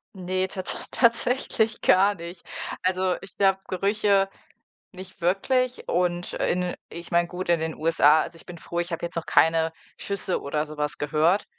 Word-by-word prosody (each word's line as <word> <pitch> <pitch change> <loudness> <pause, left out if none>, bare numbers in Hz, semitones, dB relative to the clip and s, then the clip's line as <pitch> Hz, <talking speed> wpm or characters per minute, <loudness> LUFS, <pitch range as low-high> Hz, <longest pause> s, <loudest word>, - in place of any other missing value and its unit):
Ne, 185 0 -1
tat 185 -1 -3
tatsächlich 235 -2 +1
gar 200 +2 +5
nicht. 170 0 -10 0.4
Also, 185 0 +1
ich 195 - -13
glaube, 195 -1 +3
Gerüche 200 +1 +2 0.7
nicht 185 +1 -11
wirklich 250 +8 0
und 175 0 0
in 180 0 0 0.2
ich 170 +1 -9
meine, 170 0 +3
gut 180 +1 -6
in 170 -2 +4
den 160 -1 -3
USA 155 -1 +4
also, 170 - -6
ich - - -16
bin 175 -1 -9
froh, 170 +1 -5
ich 175 0 -2
habe 165 +1 -3
jetzt - - -6
noch 165 - -3
keine 160 0 +3 0.3
Schüsse 200 -2 -1
oder 150 +2 -2
so 155 0 -10
was 150 0 -2
gehört. 155 +6 +2
180 Hz, 170 wpm, -25 LUFS, 165-195 Hz, 0.7 s, gar